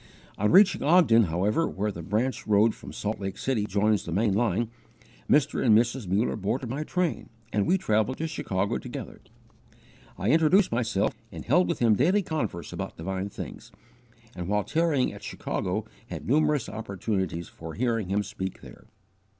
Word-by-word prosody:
On 105 Hz, +1 st, +1 dB
reaching 195 Hz, +1 st, +6 dB
Ogden, 145 Hz, -, +5 dB
however, 95 Hz, -, +1 dB
where 105 Hz, +2 st, -2 dB
the 85 Hz, -, -7 dB
branch 110 Hz, +10 st, -1 dB
road 105 Hz, +1 st, +4 dB
from -, -, -11 dB
Salt 105 Hz, +1 st, -3 dB
Lake 95 Hz, 0 st, -4 dB
City 120 Hz, -6 st, -1 dB
joins 105 Hz, +1 st, +1 dB
the 85 Hz, -, -6 dB
main 100 Hz, +3 st, +2 dB
line, 115 Hz, +1 st, 0 dB, 0.6 s
Mr. 145 Hz, 0 st, +3 dB
and 110 Hz, -4 st, +6 dB
Mrs. 120 Hz, -1 st, 0 dB
Muller 100 Hz, +6 st, +1 dB
boarded 115 Hz, +4 st, -2 dB
my 145 Hz, +4 st, -2 dB
train 180 Hz, +1 st, -2 dB, 0.2 s
and 105 Hz, -2 st, +1 dB
we 190 Hz, -, +4 dB
travelled 110 Hz, -, 0 dB
to 160 Hz, -, -2 dB
Chicago 100 Hz, -, -2 dB
together. -, -, -8 dB, 1.0 s
I 100 Hz, +5 st, +1 dB
introduced 165 Hz, +5 st, +4 dB
myself, 115 Hz, -4 st, 0 dB, 0.2 s
and -, -, -8 dB
held 90 Hz, -, +3 dB
with -, -, -1 dB
him 115 Hz, -3 st, +4 dB
daily 180 Hz, -, +3 dB
converse 110 Hz, -, -3 dB
about -, -, -5 dB
divine 95 Hz, +3 st, -3 dB
things, -, -, -9 dB, 0.6 s
and, 90 Hz, -1 st, -5 dB
while 105 Hz, +1 st, +1 dB
tarrying 155 Hz, -, +1 dB
at -, -, -11 dB
Chicago, -, -, -3 dB, 0.2 s
had -, -, -7 dB
numerous 150 Hz, -1 st, +2 dB
opportunities 95 Hz, -5 st, -3 dB
for 80 Hz, 0 st, -9 dB
hearing 115 Hz, -5 st, -1 dB
him 100 Hz, +1 st, +1 dB
speak 95 Hz, -2 st, -6 dB
there. -, -, -14 dB
110 Hz, 165 wpm, -27 LUFS, 100-135 Hz, 1.0 s, reaching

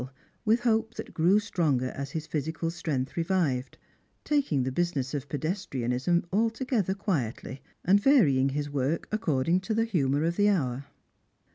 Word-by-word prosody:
Ill 125 Hz, -, -5 dB
^ -, -, -18 dB
OO -, -, -29 dB, 0.3 s
' -, -, -45 dB
with 225 Hz, +2 st, +4 dB
hope 225 Hz, -1 st, +1 dB
that -, -, -7 dB
grew 175 Hz, +5 st, +4 dB
stronger 155 Hz, -11 st, 0 dB
as 140 Hz, 0 st, -5 dB
his 155 Hz, +2 st, -4 dB
physical 160 Hz, +2 st, -3 dB
strength 150 Hz, -6 st, -3 dB
revived: 165 Hz, -7 st, 0 dB, 0.5 s
taking 275 Hz, -, +1 dB
the 130 Hz, -, -2 dB
business 145 Hz, -4 st, -1 dB
of 140 Hz, -1 st, -4 dB
pedestrianism 145 Hz, -, -1 dB
altogether 225 Hz, -2 st, 0 dB
quietly, 140 Hz, -, -3 dB, 0.2 s
and 200 Hz, +3 st, +5 dB
varying 155 Hz, -, +4 dB
his 145 Hz, +2 st, -2 dB
work 145 Hz, +3 st, -1 dB
according 170 Hz, -6 st, +1 dB
to 215 Hz, +4 st, -3 dB
the 225 Hz, +1 st, +2 dB
humour 145 Hz, -9 st, +1 dB
of 170 Hz, +1 st, 0 dB
the 205 Hz, 0 st, +4 dB
hour. 135 Hz, -8 st, 0 dB
165 Hz, 165 wpm, -28 LUFS, 135-205 Hz, 0.5 s, and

